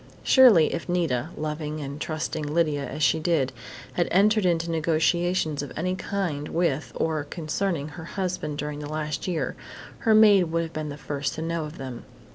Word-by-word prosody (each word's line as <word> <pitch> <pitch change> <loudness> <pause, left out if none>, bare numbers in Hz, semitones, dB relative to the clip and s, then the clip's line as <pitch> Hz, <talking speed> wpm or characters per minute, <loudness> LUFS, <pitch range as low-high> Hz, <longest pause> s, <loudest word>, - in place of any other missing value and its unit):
Surely 235 - +6
if 170 - -4
Nita, 160 -6 0
loving 150 0 -3
and 140 0 -6
trusting 155 0 -3
Lydia 150 -1 0
as 150 - -3
she 160 - +4
did, 155 -6 +1 0.4
had 175 - +1
entered 205 +1 +4
into 170 -1 +1
negotiations 165 0 +1
of 145 - -6
any 185 +4 0
kind 180 -7 -3
with 165 -4 0
or 155 -2 0
concerning 160 0 -2
her 160 +2 -9
husband 180 -6 -3
during 150 0 -4
the 150 0 -6
last 155 +1 -3
year, 175 -3 -1 0.4
her 220 -1 +4
maid 205 -4 +7
would 165 0 -1
have 165 - -7
been 155 -1 -4
the 145 - -6
first 145 -1 -3
to 160 - -4
know 165 -1 -2
of 150 +1 -9
them. 130 -3 -7
160 Hz, 180 wpm, -26 LUFS, 150-175 Hz, 0.4 s, maid